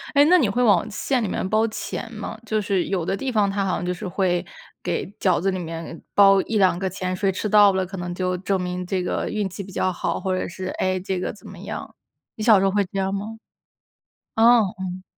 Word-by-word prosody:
哎， 285 - +7
那 355 +4 +6
你 245 -10 +2
会 245 +5 0
往 215 -1 +4
馅 250 +4 -1
里 205 - -1
面 185 - -2
包 220 +2 +3
钱 225 +1 -5
吗？ 215 0 -6
就 215 -1 0
是 195 -3 0
有 185 -4 -1
的 195 - -1
地 270 +2 -3
方 210 -4 +2
它 195 0 -1
好 190 - 0
像 175 - -4
就 180 - -1
是 200 +2 -7
会 180 -1 0 0.4
给 175 -2 -2
饺 185 -4 +2
子 195 - +1
里 185 - -3
面 165 -1 -6
包 195 -1 +7
1-2 195 -6 +2
个 190 0 -1
钱， 185 0 -3
谁 195 +1 +1
吃 205 +3 -3
到 205 -1 +6
了 190 -1 0
可 190 +2 -8
能 175 0 -4
就 185 0 -1
证 190 0 -1
明 180 0 -3
这 185 0 -1
个 - - -2
运 210 -2 -1
气 195 +2 -7
比 195 - -11
较 185 0 0
好， - - -2
或 190 -1 -1
者 - - -2
是， 185 +2 -6
唉， 185 0 +1
这 185 0 -3
个 - - -2
怎 210 - -16
么 - - -11
样， - - -7 0.4
你 215 - -6
小 215 -3 +6
时 190 - +1
候 195 - +3
会 205 -1 +2
这 195 - -3
样 195 0 0
吗？ 200 +1 -3 1.1
哦， 235 +1 +6 0.2
嗯。 185 0 -5
195 Hz, 260 characters per minute, -23 LUFS, 185-210 Hz, 1.1 s, 哎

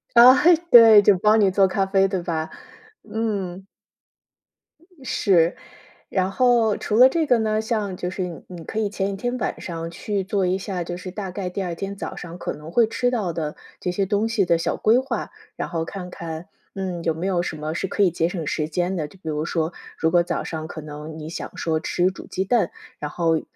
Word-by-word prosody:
啊， 245 +2 +10 0.4
对， 225 -3 +10
就 200 -1 +5
帮 215 +3 +4
你 200 -3 +4
做 195 0 +4
咖 195 +1 0
啡 195 0 +3
对 190 -2 -2
吧？ 160 -2 -3 0.6
嗯。 195 -4 -3 1.4
是， 175 -8 +2 0.5
然 190 0 0
后 235 -3 +3
除 210 - -2
了 250 +2 +9
这 325 +2 0
个 245 -5 +3
呢， 215 -1 +1
像 215 -4 -2
就 180 0 -4
是 185 0 -3
你 175 -2 -7
你 175 -3 -9
可 215 - -4
以 210 -2 0
前 195 -1 -2
1 195 - -4
天 245 +5 -2
晚 - - -3
上 165 -1 -5
去 200 +3 -3
做 195 0 0
一 180 +1 +1
下， 190 -2 -4
就 175 +1 -5
是 180 0 -7
大 195 -1 -5
概 185 -1 -4
第 195 - -4
2 175 -2 -3
天 195 +3 -5
早 - - -6
上 175 0 -8
可 - - -4
能 150 +2 -10
会 230 +1 +4
吃 245 +2 0
到 210 -8 -1
的 155 -2 -3 0.2
这 180 - -2
些 195 +2 0
东 205 +3 +1
西 225 -4 +1
的 170 -1 +3
小 165 - -1
规 225 +3 +3
划， 255 -4 -2 0.2
然 - - -4
后 165 -2 -2
看 180 0 -7
看， 165 -1 -7 0.3
嗯， 185 -3 -4
有 165 - +1
没 165 +3 -5
有 180 -3 +1
什 175 - -4
么 155 +1 -4
是 190 +3 -2
可 - - -2
以 185 - +5
节 165 0 0
省 175 -3 -4
时 155 0 -1
间 175 +4 -1
的， 155 -4 -2
就 170 - -18
比 160 - -5
如 150 0 -2
说， 165 0 -1 0.2
如 160 - +2
果 175 0 +4
早 170 0 -2
上 160 -1 -5
可 155 - -7
能 150 +1 -8
你 155 0 -7
想 170 - -7
说 160 -1 0
吃 175 +3 +1
煮 190 - -11
鸡 190 - -2
蛋， 220 -3 +1 0.3
然 150 - -4
后 165 -1 +1
185 Hz, 235 characters per minute, -23 LUFS, 165-205 Hz, 1.4 s, 啊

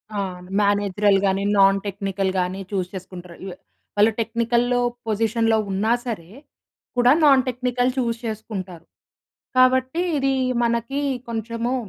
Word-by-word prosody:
ఆ! - - -1 0.4
మేనేజరల్ 205 0 +2
గాని 195 +1 +1
non 195 0 +5
technical 195 -1 -2
గాని 185 +2 -2
చూస్ 185 -2 -2
చేసుకుంటారు. 180 -2 -9
లు 180 - -6 0.4
వాళ్ళు 215 +2 +5
టెక్నికల్‌లో 235 +2 +1 0.3
పొజిషన్‌లో 225 +1 +1
ఉన్నా 210 +4 0
సరే, 185 -8 -5 0.7
కూడా 245 +1 +5
నాన్ 275 -3 +6
టెక్నికల్ 250 0 0
చూస్ 235 -2 0
చేసుకుంటారు. 195 -6 -6 0.7
కాబట్టి 260 +5 +3 0.2
ఇది 270 -1 +1 0.3
మనకి 235 +4 -1 0.3
కొంచెము 230 +2 -3
220 Hz, 115 wpm, -22 LUFS, 195-240 Hz, 0.7 s, నాన్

